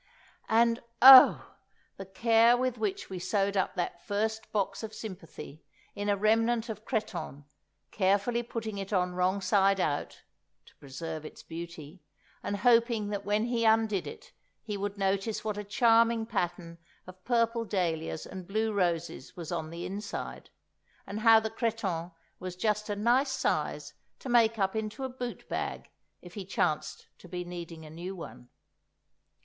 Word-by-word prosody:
And 230 +1 +3 0.2
oh! 260 0 +9 0.4
the 195 - -8
care 230 +4 +4
with 255 -2 -1
which 210 -3 -2
we 185 - -4
sewed 195 +2 0
up 190 0 0
that 175 -1 -3
first 220 +2 -2
box 200 -3 -1
of 220 -1 -7
sympathy 165 -7 -9 0.3
in 205 0 -3
a 200 - +2
remnant 225 +3 +2
of 220 0 -7
cretonne, 180 - -4 0.5
carefully 200 +4 +1
putting 225 -3 -5
it 195 +1 -6
on 180 -2 +1
wrong 185 +2 0
side 195 0 +3
out 145 -5 -2 0.4
(to - - -20
preserve 155 +3 -7
its 155 - -11
beauty), 170 0 -9 0.4
and 205 - -3
hoping 230 -3 +3
that 200 -1 -4
when 210 +2 +1
he 240 -1 -1
undid 220 -3 +2
it - - -10 0.3
he 210 -2 -4
would 200 0 -4
notice 195 +2 -1
what 215 -1 -2
a 210 - -5
charming 230 +2 +3
pattern 175 -5 -3 0.3
of 185 0 -13
purple 230 0 +1
dahlias 165 -7 -2
and 185 -2 -9
blue 220 +2 -1
roses 175 -4 -2
was 170 -2 -6
on 160 -2 -3
the 170 +1 -6
inside, 200 +2 -6 0.6
and 205 - -5
how 225 0 +7
the 220 0 -4
cretonne 200 -7 -2 0.3
was 185 -1 -6
just 210 +2 -1
a 205 - -1
nice 245 +6 +2
size - - -2 0.2
to 265 - -8
make 230 -2 +4
up 195 0 0
into 220 +4 -4
a 265 - -2
boot 250 -1 -7
bag - - -4 0.3
if 175 -1 -12
he 200 - -6
chanced 155 -4 -2
to 180 - -14
be 180 0 -5
needing 170 -2 -8
a - - -10
new 175 +4 -6
one. 125 -7 -10
205 Hz, 160 wpm, -29 LUFS, 180-225 Hz, 0.6 s, oh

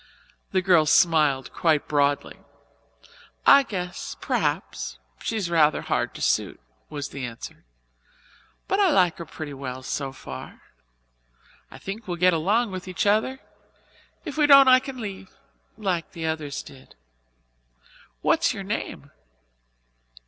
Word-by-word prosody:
The 185 -1 +1
girl 175 -5 +4
smiled 150 -6 +3
quite 155 -3 +1
broadly. 145 -1 0 1.1
"I 280 - +8
guess 180 -9 -5
p'r'aps - - -2 0.2
she's 215 -5 -2
rather 160 -3 +3
hard - - -1
to - - -5
suit," - - 0 0.3
was 145 -2 -5
the 140 - -7
answer, 115 - -8 1.0
"but 390 - 0
I 395 -2 +5
like 180 - +3
her 170 - -7
pretty 150 -2 -7
well 130 -1 -6
so 135 +1 -3
far. 135 - -10 1.1
I - - -12
think 200 +3 -7
we'll 175 -1 -3
get 180 +1 +4
along 205 +8 +1
with 185 0 -6
each 185 0 -2
other. 220 +6 +1 0.8
If 305 -2 -6
we 300 -1 +4
don't 275 -2 +8
I 255 0 +8
can 260 -1 -8
leave 195 -3 -8 0.4
like 185 -6 -2
the 165 -3 -5
others 155 -3 -3
did." 130 -1 -15 1.3
"What - - +2
is - - +3
your - - -5
name?" - - -5
175 Hz, 135 wpm, -25 LUFS, 150-215 Hz, 1.3 s, I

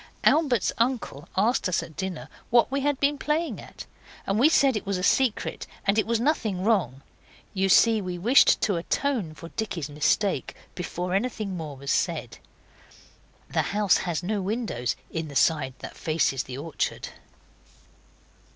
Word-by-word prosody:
Albert's 280 - +3
uncle 230 - -1
asked 215 0 +2
us 180 - 0
at 155 - -12
dinner 190 -3 -4 0.2
what 240 +2 +4
we 275 0 0
had 290 -1 0
been 285 0 +1
playing 315 +4 -1
at, - - -11 0.4
and 195 +2 0
we 280 +6 +6
said 275 -5 +4
it 210 - -2
was 200 -1 0
a 180 - -4
secret, 255 +2 +1 0.2
and 200 +2 +3
it 215 - 0
was 230 -1 +1
nothing 225 -9 0
wrong. 175 - +1 0.5
You 195 -1 +1
see 225 +2 +5
we 180 -2 -4
wished 235 +10 +5
to 200 -5 +1
atone 200 - -1
for 165 +2 -10
Dicky's 170 -9 -4
mistake 150 +7 0 0.2
before 180 0 -4
anything 205 -2 -1
more 155 -5 -6
was 140 +1 -3
said. - - -1 1.1
The - - +2 0.2
house 205 -3 +4
has 175 -1 -2
no 205 +2 -1
windows 190 - -2 0.2
in 160 -1 -3
the 140 - -10
side 135 -4 +2
that - - -8
faces 155 -5 0
the 130 0 -7
orchard. 155 +2 -3
195 Hz, 160 wpm, -26 LUFS, 165-235 Hz, 1.1 s, we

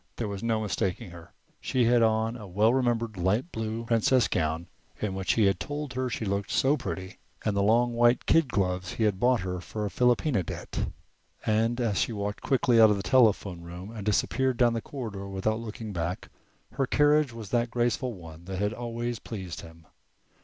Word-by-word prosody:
There 115 - -3
was 100 -1 -5
no 115 -1 0
mistaking 95 -4 -2
her. 85 -1 -12 0.3
She 125 -2 +1
had 120 0 +4
on 110 0 +2
the 110 -4 -9
well 105 +5 +3
remembered 115 -4 0
light 105 - 0
blue 110 +1 -4
princess 115 +2 +3
gown 80 0 -1 0.3
in 105 -3 -2
which 95 -2 0
he 110 - +3
had 95 0 +2
told 145 -2 -4
her 130 0 -1
she 115 - -3
looked 100 0 -2
so 135 +3 +3
pretty, 95 -7 -6 0.3
and 105 -2 +1
the 100 - +2
long 120 +4 +3
white 120 +1 +3
kid 165 -3 +4
gloves 90 -5 -1
he 115 - -1
had 105 -3 +1
bought 125 -1 +3
her 90 -1 -4
for 105 +4 -4
a 100 - -3
philopena 125 -1 +2
debt. - - -4 0.6
And 115 +3 +1
as 110 -5 0
she 115 - 0
walked 105 0 -4
quickly 125 -3 +3
out 110 - +8
of 105 - +2
the 100 - -4
telephone 100 -5 +3
room 90 +4 -9
and 110 -3 -7
disappeared 125 +5 +1
down 120 -1 +4
the 115 - -2
corridor 105 -8 -6
without 105 +3 -1
looking 110 -1 -6
back, 85 +1 -3 0.4
her 135 - -1
carriage 150 0 +3
was 115 -3 -9
that 120 -1 +1
graceful 120 0 0
one 85 -1 -12
that 95 0 -5
had 105 +2 0
always 120 0 -4
pleased 95 -6 -6
him. 80 0 -14
110 Hz, 200 wpm, -28 LUFS, 95-120 Hz, 0.6 s, out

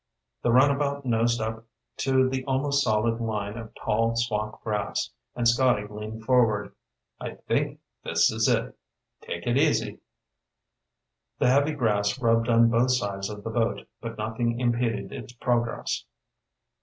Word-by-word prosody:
The 120 - +2
runabout 140 +2 +3
nosed 120 0 +2
up 110 0 -3 0.3
to 130 -1 +3
the 130 0 -2
almost 140 +1 +1
solid 115 +1 +1
line 105 -2 -2
of 115 -1 -9
tall 115 +2 0
swamp 110 -2 -1
grass, 105 -2 -2 0.2
and 120 -1 +1
Scotty 120 -3 +3
leaned 105 +1 -7
forward. 115 -5 +2 0.5
"I - - -6
think - - -2 0.2
this - - +3
is - - +1
it. - - +1 0.5
Take - - -6
it - - +2
easy." - - +1 1.4
The 125 - +3
heavy 140 +3 +3
grass 105 -5 +1
rubbed 115 -1 +2
on 115 0 +5
both 120 +2 +3
sides 100 -5 -1
of 105 -1 -8
the 115 - -4
boat, 115 0 -1
but 115 -1 -6
nothing 115 +2 -1
impeded 120 -5 0
its 120 - -8
progress. 120 -1 -1
115 Hz, 145 wpm, -26 LUFS, 110-125 Hz, 1.4 s, on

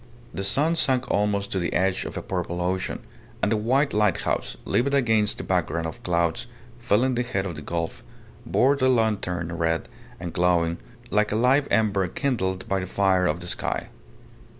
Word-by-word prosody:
The 95 - -3
sun 145 +11 +2
sank 130 -5 +1
almost 100 0 0
to 95 - 0
the 85 - -2
edge 95 +1 +1
of - - -6
a - - -4
purple 90 -2 -3
ocean; 90 +2 -2 0.4
and 105 - +1
the - - +4
white 130 +7 +1
lighthouse, 105 -3 0
livid 125 +7 +1
against 110 -6 +2
the - - -5
background 80 +2 0
of 80 - -6
clouds 85 +3 0 0.3
filling 125 +2 +2
the 125 - 0
head 100 -6 -2
of 90 -4 -4
the 75 - -7
gulf, 85 +1 -3 0.4
bore 135 +3 +3
the 130 -2 +2
lantern 100 -8 0
red 80 -1 0 0.3
and 85 -1 -6
glowing, 85 -1 +2 0.3
like 105 0 +2
a - - 0
live 130 +5 +3
ember 100 -3 +2
kindled 95 - -2
by 95 - 0
the 90 - -4
fire 95 -1 +2
of 85 +3 -1
the 90 - -6
sky. - - -2
100 Hz, 180 wpm, -25 LUFS, 90-120 Hz, 0.4 s, the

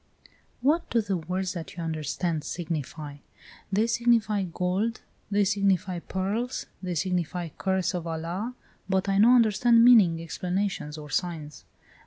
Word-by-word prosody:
"What 305 +6 +2
do 235 - +2
the 205 -3 -1
words 180 +3 -3
that 170 -1 -7
you 170 - -4
understand 160 0 -2
signify?" 155 -3 -5 0.5
"They 210 +3 +3
signify 230 -4 +2
GOLD, 185 +7 -1 0.3
they 205 0 +3
signify 195 -2 +1
PEARLS, 200 +8 -3 0.2
they 180 -2 -3
signify 175 0 -1
CURSE 190 +4 -1
OF 175 -2 -3
ALA. 170 +9 -4 0.3
But 190 +1 +1
I 195 0 +2
no 235 +4 +7
understand 230 +1 +5
meaning, 200 -9 +6
explanations, 180 -1 -3
or 150 -2 -9
signs. 155 -2 -3
185 Hz, 135 wpm, -27 LUFS, 165-210 Hz, 0.5 s, no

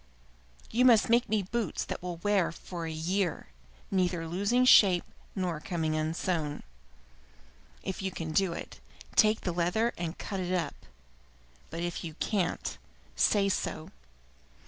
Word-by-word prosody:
You 245 +3 +3
must 230 -3 +6
make 240 +1 +4
me 215 -2 +1
boots 220 -1 -2
that - - -5
will 175 -1 -5
wear 195 0 +1
for 170 0 -6
a - - -4
year, 170 - -1 0.4
neither 180 -3 0
losing 205 +9 +2
shape 190 -8 +7 0.3
nor 180 -5 -1
coming 160 -1 -2
unsown. 155 -1 -1 1.2
If 190 0 -4
you 190 - -1
can 165 -3 -5
do 185 +3 +2
it, - - -7 0.4
take 215 0 +5
the 180 - -1
leather 180 +7 +1
and 170 0 -3
cut 195 -2 -4
it 180 0 -2
up; 165 -5 -4 0.8
but 165 +1 -4
if 175 -1 -3
you 160 -2 -6
can't, 185 -1 -1 0.4
say 200 -2 +3
so. 175 -3 -2
180 Hz, 145 wpm, -30 LUFS, 165-200 Hz, 1.2 s, shape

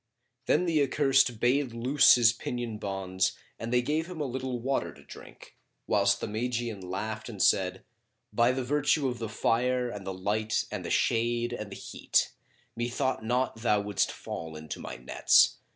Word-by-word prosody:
Then 180 - +3
the 160 -4 +2
accursed 135 -4 +3
bade 125 +1 +1
loose 130 +5 +5
his 115 -2 +5
pinion 115 -2 -5
bonds 95 -2 -1 0.3
and 115 +1 -5
they 125 0 +3
gave 155 +5 -1
him 180 -3 -7
a 150 - -1
little 130 -1 -3
water 135 +3 -1
to - - -17
drink, - - -13 0.3
whilst 100 -1 +2
the - - -3
Magian 115 -1 -3
laughed 110 +5 -5
and 105 -4 -8
said, 95 0 +2 0.5
"By 120 +1 +4
the 130 0 -2
virtue 145 +2 +1
of 125 - -5
the 115 -2 -4
Fire 125 +3 +1
and 105 -3 -7
the 95 - -4
Light 105 +4 -1
and - - -4
the - - -5
Shade 120 +1 +1
and 105 -4 -6
the - - -6
Heat, - - 0 0.4
methought 120 +1 -1
not 125 +2 0
thou 110 -2 +2
wouldst 100 -1 0
fall 80 -1 -7
into 75 0 -7
my - - -7
nets! 60 - +3
120 Hz, 175 wpm, -28 LUFS, 105-125 Hz, 0.5 s, loose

